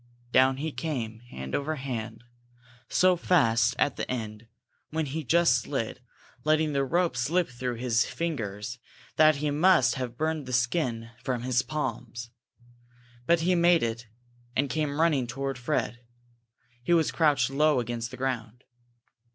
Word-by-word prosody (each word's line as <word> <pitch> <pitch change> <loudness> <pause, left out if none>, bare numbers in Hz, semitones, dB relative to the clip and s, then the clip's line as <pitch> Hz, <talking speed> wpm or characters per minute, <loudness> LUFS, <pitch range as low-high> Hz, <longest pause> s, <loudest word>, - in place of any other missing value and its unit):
Down 130 +1 +4
he 155 +3 -3
came, 120 -9 -4
hand 65 - -7
over 155 +3 -1
hand, 120 -5 -5 0.7
so 185 0 +4
fast 150 -10 +3
at 145 - +1
the - - -4
end, 110 -2 -5 0.4
when 160 0 -1
he 150 +3 -4
just 170 +5 +4
slid, 125 -4 -3 0.4
letting 155 0 +2
the 140 0 +1
rope 170 +1 +1
slip 155 +7 +1
through 125 0 -4
his 120 -1 +1
fingers, 115 -8 -4 0.4
that 155 -1 +6
he 145 +1 -1
must 155 -4 +4
have 120 -1 -5
burned 155 -2 -1
the 130 - -5
skin 120 -3 0
from 125 -2 -2
his 125 0 +2
palms. 120 -5 -4 1.0
But 170 0 +4
he 180 +3 +2
made 170 -2 +4
it, 115 0 -3 0.5
and 140 0 +1
came 150 -2 -1
running 150 -7 +2
toward 135 +1 -4
Fred. 120 -1 -1 0.8
He 175 +8 +2
was 160 -2 +2
crouched 150 -4 +2
low 150 0 +3
against 120 -1 -3
the 125 - -9
ground. 125 -2 -3
130 Hz, 150 wpm, -27 LUFS, 120-155 Hz, 1.0 s, that